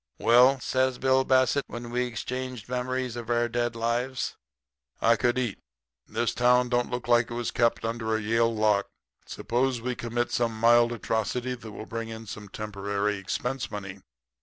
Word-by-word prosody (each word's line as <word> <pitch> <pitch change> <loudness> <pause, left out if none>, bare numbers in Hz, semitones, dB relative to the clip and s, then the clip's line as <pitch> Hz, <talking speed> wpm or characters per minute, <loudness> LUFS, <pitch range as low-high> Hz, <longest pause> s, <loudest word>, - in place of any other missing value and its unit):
"'Well,' 125 +3 +5
says 130 0 0
Bill 130 0 +3
Bassett, 130 +2 +3
when 120 0 -7
we 125 +1 0
had - - -3
exchanged 125 0 -5
memories 125 0 -2
of 120 -1 -7
our 120 0 +2
dead 120 0 -1
lives, 120 +3 -1 0.6
'I 115 +1 +4
could 120 +1 +1
eat. 120 -6 -1 0.5
This - - -1
town 125 0 +3
don't 120 0 +1
look 125 0 -4
like 120 -1 +4
it 120 - -5
was 120 -1 -2
kept 115 -1 +1
under 115 -1 -1
a - - 0
Yale 115 +2 +2
lock. 105 -2 +2 0.4
Suppose 125 +1 -1
we 125 +2 -2
commit 120 0 -2
some 115 -2 0
mild 120 +1 +5
atrocity 120 +2 -2
that 115 -3 -9
will 110 - -8
bring 115 0 -5
in 115 0 -7
temporary 100 0 -3
expense 125 +7 -3
money. 100 -2 -7
120 Hz, 170 wpm, -27 LUFS, 110-125 Hz, 0.6 s, Well